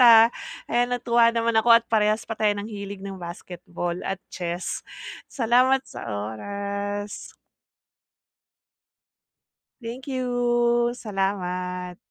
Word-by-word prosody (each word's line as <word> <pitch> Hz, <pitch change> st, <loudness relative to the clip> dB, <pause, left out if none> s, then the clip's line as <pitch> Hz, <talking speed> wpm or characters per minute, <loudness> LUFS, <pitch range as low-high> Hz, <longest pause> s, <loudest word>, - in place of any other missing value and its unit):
ah. 230 Hz, -2 st, +9 dB, 0.4 s
Ayan 245 Hz, +1 st, +1 dB
natuwa 235 Hz, -1 st, +4 dB
naman 230 Hz, 0 st, 0 dB
ako 235 Hz, +1 st, +1 dB
at 230 Hz, -, -26 dB
parehas 215 Hz, 0 st, +2 dB
pa 225 Hz, -, -3 dB
tayo 215 Hz, -1 st, +2 dB
ng 205 Hz, -, -4 dB
hilig 200 Hz, -2 st, -6 dB
ng 195 Hz, -2 st, -7 dB
basketball 175 Hz, 0 st, -5 dB
at 195 Hz, -1 st, -3 dB
chess. 175 Hz, 0 st, -3 dB, 0.5 s
Salamat 255 Hz, +2 st, +3 dB
sa -, -, -8 dB
oras! 200 Hz, -, -4 dB, 2.5 s
Thank 235 Hz, +3 st, -7 dB
you! 240 Hz, -2 st, +1 dB
Salamat. 180 Hz, -4 st, -3 dB
210 Hz, 105 wpm, -25 LUFS, 185-240 Hz, 2.5 s, ah